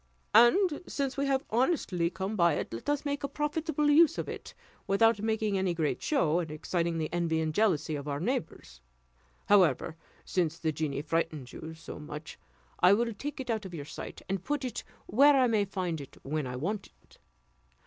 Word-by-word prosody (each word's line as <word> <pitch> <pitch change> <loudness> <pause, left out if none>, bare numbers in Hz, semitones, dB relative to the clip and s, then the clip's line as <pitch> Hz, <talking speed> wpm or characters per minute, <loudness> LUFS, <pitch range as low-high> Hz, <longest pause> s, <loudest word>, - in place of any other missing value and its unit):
And 290 - +5
since 275 -2 -2
we 280 0 0
have 270 -1 +1
honestly 220 - +1
come 190 +4 -4
by 170 -3 +4
it, - - -4
let 115 - -5
us 290 0 0
make 285 0 -2
a - - 0
profitable 300 +1 -1
use 320 +2 +6
of - - -3
it, - - -8 0.3
without 210 +2 +4
making 220 -2 0
any 185 -2 0
great 160 -3 -1
show, 175 - +2
and 165 -3 -3
exciting 165 +2 -2
the 160 0 -3
envy 170 -2 +1
and 160 -1 -1
jealousy 165 -6 +1
of 145 0 -6
our 140 -1 -2
neighbours. 165 - -4 0.6
However, 180 -4 +3 0.3
since 170 -3 0
the 160 -2 -1
genies 150 -1 -3
frighten 160 -3 -1
you 160 +5 -8
so 160 - -9
much, 150 +1 -8 0.4
I 180 +2 +7
will 230 +2 +1
take 290 +7 -6
it 255 -2 -3
out 220 -2 -1
of 185 -3 -7
your 145 -3 -6
sight, - - -8
and 190 -1 -2
put 290 -2 -2
it 250 - -4 0.2
where 280 +7 +5
I 260 -2 +5
may 220 -4 +2
find 180 -5 -3
it 140 - -12
when 150 0 -2
I 125 - -5
want 195 +10 -3
it. - - -23
190 Hz, 195 wpm, -30 LUFS, 160-255 Hz, 0.6 s, I